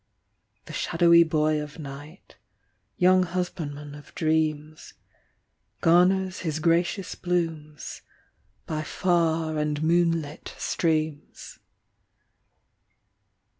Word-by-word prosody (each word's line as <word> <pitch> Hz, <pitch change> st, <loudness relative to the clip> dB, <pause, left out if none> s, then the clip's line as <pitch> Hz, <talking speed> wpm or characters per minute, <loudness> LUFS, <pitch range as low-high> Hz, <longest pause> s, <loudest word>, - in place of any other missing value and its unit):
The -, -, -10 dB
shadowy 170 Hz, 0 st, +4 dB
boy 155 Hz, -2 st, +2 dB
of 150 Hz, -1 st, -8 dB
night, 145 Hz, +4 st, -10 dB, 0.6 s
Young 185 Hz, +1 st, +5 dB
husbandman 165 Hz, -5 st, -4 dB
of 145 Hz, 0 st, -13 dB
dreams, 155 Hz, -1 st, -1 dB, 0.9 s
Garners 185 Hz, +2 st, +3 dB
his 155 Hz, -4 st, -2 dB
gracious 170 Hz, +3 st, +1 dB
blooms 165 Hz, -5 st, -3 dB, 0.6 s
By 155 Hz, -1 st, -3 dB
far 165 Hz, -2 st, 0 dB
and 150 Hz, 0 st, -1 dB
moonlit 165 Hz, -2 st, 0 dB
streams. 155 Hz, -3 st, -2 dB
160 Hz, 80 wpm, -26 LUFS, 150-175 Hz, 0.9 s, Young